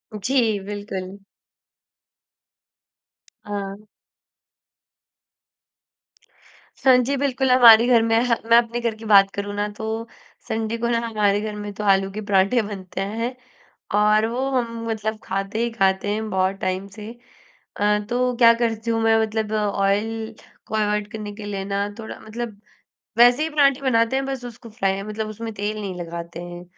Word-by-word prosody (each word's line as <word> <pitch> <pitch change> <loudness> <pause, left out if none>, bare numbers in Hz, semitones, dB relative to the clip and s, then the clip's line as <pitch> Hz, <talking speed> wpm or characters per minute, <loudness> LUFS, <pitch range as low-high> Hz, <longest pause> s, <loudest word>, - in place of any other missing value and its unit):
जी, 225 0 +1
बिल्कुल। 200 -2 -6 2.3
हाँ। 200 0 -5 2.9
स - - -5 0.2
जी। 280 +3 0
बिल्कुल, 265 -1 0
हमारे 235 -2 +8
घर 240 -2 +5
में 225 0 +3
हाँ, 235 -2 +2
मैं 230 +1 +6
अपने 235 0 +1
घर 235 -2 -1
की 220 +1 -12
बात 200 -2 +6
करूँ 200 0 -4
ना, 205 0 -1
तो 220 +2 -5 0.4
संडे 220 +1 -2
को 235 +1 -1
ना 235 -1 +2
हमारे 205 -2 +1
घर 215 -1 -4
में 205 0 -6
तो 210 - -6
आलू 195 -1 +3
के 210 +2 -5
पराठे 200 +4 +3
बनते 195 -3 -6
हैं, 230 +5 -3 0.6
और 210 +1 +4
वो 255 +4 -2
हम, 230 -3 -2
मतलब 220 0 -3
खाते 195 +3 -3
ही 235 - 0
खाते 195 -2 +1
हैं 215 +1 -2
बहुत 190 0 0
टाइम 185 +1 -2
से। 210 0 -7 0.7
अ, 210 0 +2
तो 250 +1 0
क्या 230 -1 +7
करती 225 0 -1
हूँ 225 0 0
मैं, 225 0 +4
मतलब 220 -1 -2
ऑयल 215 +2 -1 0.3
को - - -4
अवॉइड 210 0 0
करने 210 -2 -6
के 210 0 -8
लिए 200 -1 -4
ना, 200 +1 -1
थोड़ा 220 - -8
मतलब 220 -2 -6 0.6
वैसे 245 +4 +6
ही 320 - -3
पराठे 280 -2 +3
बनाते 230 -1 +2
हैं, 270 - 0
बस 270 -2 -4
उसको 235 0 -10
फ्राय 195 -3 -1
मतलब 215 +1 -4
उसमें 225 +1 -6
तेल 205 +1 -3
नहीं 195 -3 -4
लगाते 170 0 -7
हैं। 175 0 -9
215 Hz, 160 wpm, -22 LUFS, 200-230 Hz, 2.9 s, हमारे